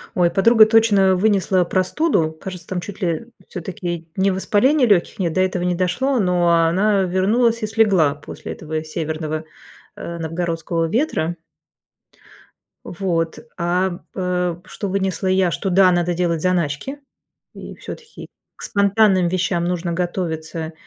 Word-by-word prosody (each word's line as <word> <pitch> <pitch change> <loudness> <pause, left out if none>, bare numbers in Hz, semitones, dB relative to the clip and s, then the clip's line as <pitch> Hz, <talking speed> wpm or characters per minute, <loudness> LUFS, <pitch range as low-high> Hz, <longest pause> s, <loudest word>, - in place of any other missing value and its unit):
Ой, 175 -2 +3
подруга 220 +5 +6
точно 215 -4 +4
вынесла 190 -2 +2
простуду. 185 - 0
Кажется, 180 -3 -8
там 185 -2 -3
чуть 200 +2 -9
ли, 180 - +1
э, 165 +6 -2 0.2
всё-таки 175 -2 -5
не 195 +1 +3
воспаление 245 +9 +2
лёгких 195 -2 +2
нет, 175 -3 0
до 185 - 0
этого 185 -1 0
не 180 0 0
дошло, 235 +10 0
но 180 -3 +2
она 185 +5 +3
вернулась 220 +6 +1
и - - 0
слегла 195 -9 +3
после 145 - -9
этого 155 0 -5
северного, 155 0 -4 0.5
э, 170 0 -6
новгородского 165 0 -2
ветра. 195 - 0 1.5
Вот. 170 -3 -2 0.2
А, 180 +2 +1
м, 175 -4 -9
э, 180 -2 -1
что 200 - -6
вынесла 190 -1 -1
я- 185 -1 +2
что, 195 - -2
да, 185 0 +5
надо 175 0 +1
делать 170 -2 -1
заначки, 180 - -1 0.6
и - - -10
всё-таки 460 -1 -10 0.3
к - - -12
спонтанным 200 -2 +3
вещам 175 -1 0
нужно 175 0 -2
готовиться, 165 -2 -3
180 Hz, 140 wpm, -20 LUFS, 170-195 Hz, 1.5 s, подруга